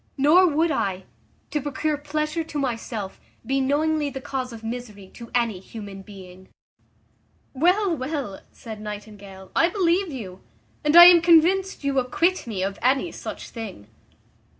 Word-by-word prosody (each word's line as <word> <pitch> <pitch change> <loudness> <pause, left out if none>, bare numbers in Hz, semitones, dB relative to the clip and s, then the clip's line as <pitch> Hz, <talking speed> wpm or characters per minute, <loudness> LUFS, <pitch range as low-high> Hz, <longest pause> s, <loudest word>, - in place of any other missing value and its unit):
Nor 315 +7 +5
would 320 +1 +1
I, 190 -8 -2 0.5
to 300 - -1
procure 295 +2 -2
pleasure 305 +2 -3
to 310 -2 -7
myself, 230 -6 -4 0.3
be 270 +1 0
knowingly 295 +2 +1
the 270 - -6
cause 260 -1 -4
of 225 -1 -10
misery 225 -4 -7
to 235 -1 -11
any 230 -6 0
human 200 0 -9
being." 190 -2 -13 1.0
"Well, 360 +6 +2
well," 260 -7 -4
said 220 -2 -10
Nightingale, 205 -2 -9
"I 335 - +4
believe 365 -1 +1
you, 195 -9 -8 0.4
and 300 +1 +2
I 345 0 +12
am 350 -1 +8
convinced 350 +2 +3
you 275 -1 +1
acquit 330 +7 0
me 200 -5 -3
of 195 +1 -3
any 265 +7 +1
such - - -8
thing." 200 - -9
265 Hz, 150 wpm, -24 LUFS, 210-315 Hz, 1.0 s, I